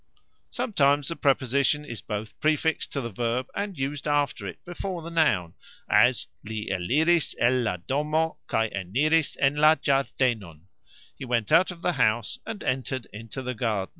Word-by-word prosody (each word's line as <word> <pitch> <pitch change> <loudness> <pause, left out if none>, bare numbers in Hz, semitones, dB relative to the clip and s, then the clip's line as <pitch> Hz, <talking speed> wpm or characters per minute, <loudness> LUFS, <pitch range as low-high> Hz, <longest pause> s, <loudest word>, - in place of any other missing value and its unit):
Sometimes 145 - +2
the 165 - -3
preposition 140 +1 +2
is 120 -5 -6
both 105 0 -6
prefixed 155 +1 +1
to 140 - -1
the 115 -2 -5
verb 120 +4 -1
and 200 -4 -3
used 140 +2 -3
after 145 -1 0
it - - -7
before 175 0 -5
the 170 - -7
noun, 120 - +2 0.3
as 120 +4 +4 0.2
"Li 110 0 -5
eliris 150 - +2
el 125 +2 +3
la 105 -6 -1
domo, 150 - -1
kaj 110 -1 0
eniris 140 - +1
en 140 +1 +2
la 155 +1 +6
gxardenon", 120 - 0 0.5
He - - -9
went 120 -2 -1
out 165 +4 +5
of 175 -2 -9
the 180 - +2
house, 110 -3 +1
and 220 -3 -5
entered 130 -1 -2
into 115 +5 -7
the 125 0 -3
garden. 105 -5 -1
135 Hz, 165 wpm, -26 LUFS, 115-155 Hz, 0.5 s, la